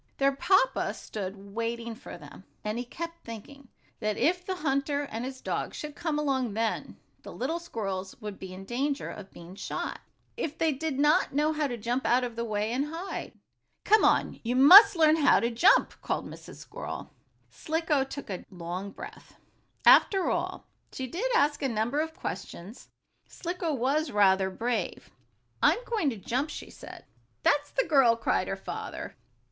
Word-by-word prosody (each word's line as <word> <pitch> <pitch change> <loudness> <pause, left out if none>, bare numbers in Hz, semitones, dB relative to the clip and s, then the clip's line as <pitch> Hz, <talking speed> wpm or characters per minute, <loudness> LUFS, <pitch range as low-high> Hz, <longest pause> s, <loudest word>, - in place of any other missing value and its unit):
Their 275 0 +3
papa 380 - +2
stood 200 -1 -7
waiting 230 +1 -3
for 225 - -10
them, 150 +2 -13 0.2
and 215 +2 -2
he 245 - -4
kept 335 +6 -7
thinking 250 +5 -10 0.3
that 215 0 -1
if 360 +3 +1
the 375 0 -3
hunter 285 -2 0
and 230 -4 -5
his 260 0 -6
dog - - -3
should 300 -1 -6
come 315 -3 -2
along 260 -7 0
then, 225 -1 -2 0.2
the - - -10
little 320 +7 -2
squirrels 195 - -5
would 210 -3 -7
be 190 -1 -8
in 190 +1 -9
danger 275 +6 -2
of 200 -2 -10
being 170 +1 -12
shot, 195 - -4 0.4
if 320 -10 -4
they 320 -1 +2
did 295 0 -3
not 295 0 +3
know 300 +2 +2
how 300 -1 0
to 245 -3 -4
jump 240 +4 -2
out 250 +1 +3
of 240 -2 -4
the 235 - -2
way, 215 -1 -1
and 265 +4 0
hide. 335 +5 -6 0.5
"Come 430 +1 +5
on. - - +2
You 240 +2 -1
must 390 - +10
learn 315 -1 +5
to 245 -5 +4
jump!" 340 +13 +4
called - - -2
Mrs. - - -11
Squirrel. - - -7 0.4
Slicko 320 -3 0
took 270 -4 -7
a 185 - -5
long 180 +2 -5
breath. 400 - -11 0.5
After 385 -3 +6
all, - - -3 0.2
though - - -18
she 260 - -2
did 365 - -2
ask 295 -7 +2
a 275 - 0
number 230 +5 0
of 320 +1 -2
questions, 195 +8 -7 0.4
Slicko 345 -1 -3
was 280 +4 0
rather 190 -2 +3
brave. 230 +5 -3 0.5
"I'm - - +5
going 425 -11 0
to 230 - -5
jump," 255 - -2
she - - -8
said. - - -11 0.4
"That's 290 0 +2
the - - 0
girl!" 270 -7 +5
cried 230 - 0
her - - -2
father. - - -6
265 Hz, 175 wpm, -28 LUFS, 220-310 Hz, 0.5 s, must